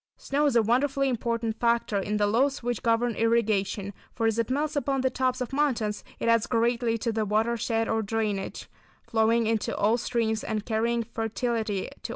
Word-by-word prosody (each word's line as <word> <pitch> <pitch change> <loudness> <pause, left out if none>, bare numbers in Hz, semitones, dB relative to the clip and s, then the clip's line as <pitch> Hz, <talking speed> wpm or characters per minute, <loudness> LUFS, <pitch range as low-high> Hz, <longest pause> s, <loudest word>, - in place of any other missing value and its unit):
Snow 290 +2 0
is 275 - +1
a 230 - +5
wonderfully 275 +4 +1
important 230 -2 -2
factor 235 -3 +1
in 210 +2 -1
the 205 - +2
laws 250 +6 +1
which 240 -2 -2
govern 230 +1 +1
irrigation, 215 -3 0 0.2
for 230 - -1
as 225 0 +1
it 230 - 0
melts 295 +4 -1
upon 275 -1 0
the 260 0 +1
tops 255 0 0
of 250 +1 -4
mountains 240 -8 0
it - - -3
adds 230 -1 +3
greatly 235 0 +1
to 230 +1 -1
the 220 0 -1
watershed 225 +2 0
or 225 - +1
drainage, 210 -2 -3 0.4
flowing 225 +1 +2
into 220 -1 -1
all 220 +4 +2
streams 225 -2 -1
and 215 -2 -3
carrying 230 +1 0
fertility 225 -2 -2
to - - -5
all - - -7
regions. - - -6
230 Hz, 195 wpm, -27 LUFS, 220-245 Hz, 0.4 s, a